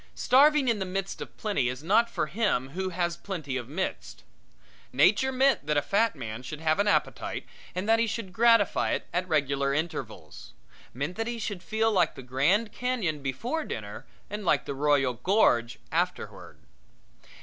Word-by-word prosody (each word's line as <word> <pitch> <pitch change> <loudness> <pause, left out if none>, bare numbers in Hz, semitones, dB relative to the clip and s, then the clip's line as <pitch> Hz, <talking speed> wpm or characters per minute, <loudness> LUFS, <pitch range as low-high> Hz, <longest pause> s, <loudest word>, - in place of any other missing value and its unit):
Starving 285 +1 +4
in 230 -3 +2
the - - -1
midst 195 +1 -4
of - - -9
plenty 195 - 0
is 130 +3 -6
not 225 +7 +3
for - - -1
him 195 - 0
who 185 +6 -3
has 175 -1 -1
plenty 165 -8 -5
of 125 -2 -4
midst. 185 +6 -4 0.7
Nature 265 0 +3
meant 265 - +2
that 150 -1 +1
a - - +4
fat 215 0 +1
man 115 -3 -6
should 140 +4 -7
have 160 +1 +1
an 205 - +2
appetite 205 - 0 0.3
and 185 +3 -3
that 225 0 +4
he 230 - +2
should 220 -4 -5
gratify 230 -1 +3
it - - -2
at 180 +1 -1
regular 140 -3 +1
intervals 160 +3 -5 0.4
meant 140 - -4
that 225 0 -2
he 240 0 -3
should 205 -5 -4
feel 220 +3 0
like 180 -6 +2
the 135 - -9
Grand 160 - +1
Canyon 220 - -2
before 235 - -3
dinner 105 - -7 0.2
and 210 +1 -5
like 180 - +2
the - - -4
Royal 140 -2 +2
Gorge 120 - +2
afterward. - - -3
185 Hz, 175 wpm, -27 LUFS, 140-225 Hz, 0.7 s, Starving